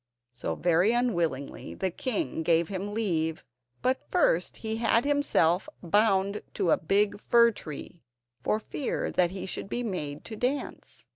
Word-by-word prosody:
So, 120 - -3
very 175 +5 +3
unwillingly, 170 - -1
the 190 -1 -1
king 190 - -2
gave 165 0 +2
him 200 +1 -4
leave; 160 -7 -1 0.4
but 255 +1 +2
first 180 - +2
he 220 0 -3
had 230 +2 +2
himself 285 - +2
bound 200 +2 +2
to 185 -5 +1
a - - +5
big 200 +5 +1
fir 235 -1 +5
tree, 160 -3 -9 0.4
for 215 - +1
fear 265 +5 -3
that 180 -1 +3
he 190 +1 -5
should 195 - -4
be 245 - -2
made 150 -9 -4
to 220 - -6
dance. 255 +6 -3
195 Hz, 150 wpm, -28 LUFS, 165-230 Hz, 0.4 s, a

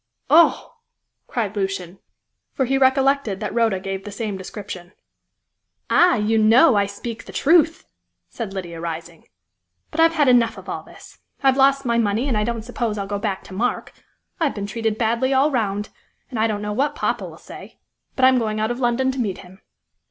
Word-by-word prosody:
"Oh!" 335 +6 +4 0.5
cried 220 -4 -3
Lucian, 195 -2 -3 0.5
for 265 - 0
he 270 +2 0
recollected 265 -5 +2
that 210 -2 -4
Rhoda 225 -5 +1
gave 195 0 -5
the 205 - -7
same 205 0 -4
description. 190 -1 -8 1.0
"Ah! 355 0 +5
you 220 0 +1
know 230 +6 +6
I 200 -1 +2
speak 220 +3 -7
the - - -10
truth!" 325 +1 +3 0.4
said 225 -5 -6
Lydia, 175 -4 -6
rising, 170 0 -7 0.6
"but 325 - -5
I've 330 0 +5
had 295 -3 +3
enough 245 -2 +4
of - - -11
all - - -4
this. - - -16 0.2
I've 265 -1 +4
lost 275 0 +3
my 235 -1 +1
money, 220 +4 0
and 255 - 0
I 210 - +1
don't 230 0 -3
suppose 235 -3 -3
I'll 200 - -3
go 200 0 -3
back 200 -2 -3
to - - -12
Mark. 235 +6 -2 0.5
I've 315 -4 0
been 200 -2 -4
treated 220 +1 -2
badly 235 +4 +1
all 280 +3 +3
round, 210 -5 -1 0.4
and 235 - -3
I 220 - +3
don't 210 -2 -3
know 210 0 -3
what 275 +7 0
poppa - - -1
will - - -13
say. - - -12 0.4
But 260 - +3
I'm 260 -1 +5
going 215 -2 -2
out 220 +2 0
of 240 - -4
London 260 +1 +1
to 260 - -6
meet 205 -6 -1
him." 190 +2 -15
225 Hz, 195 wpm, -21 LUFS, 200-260 Hz, 1.0 s, know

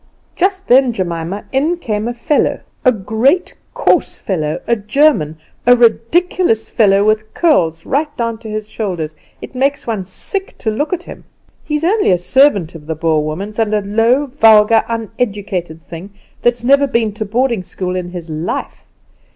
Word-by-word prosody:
Just 380 +1 0
then, 255 -1 +5
Jemima, 175 0 -4
in 300 +6 +1
came 215 -8 -3
a 240 - -2
fellow, 285 +5 0 0.2
a 255 - +5
great, 235 - 0 0.2
coarse - - +2
fellow, 155 -6 -3
a 235 - +2
German 210 - +1 0.3
a 245 - +8
ridiculous 240 +3 +1
fellow, 200 -3 +3
with 215 0 +1
curls 165 - +2
right 295 +3 0
down 230 -2 -2
to 225 -1 -9
his 215 0 -4
shoulders; 175 -9 -4 0.3
it - - -9
makes 275 +2 0
one 220 -5 -2
sick 380 - -5
to 220 - -2
look 295 +8 -2
at 355 -1 -2
him. - - -11 0.4
He's 300 0 -2
only 410 +5 +2
a 180 - +4
servant 200 - +2
of 155 -3 -12
the 160 - -2
Boer 160 -1 +1
woman's, 195 +9 -5
and 215 -1 +1
a 210 - +1
low, 225 +7 +2
vulgar, 225 -4 +5
uneducated 205 -7 -3
thing; 175 +3 -9 0.3
that's 240 0 +1
never 280 +3 +4
been 230 -5 0
to 215 - -4
boarding 235 +1 0
school 180 0 -5
in 180 -1 -3
his 175 -2 -7
life. 155 +1 -5
220 Hz, 165 wpm, -16 LUFS, 185-265 Hz, 0.4 s, a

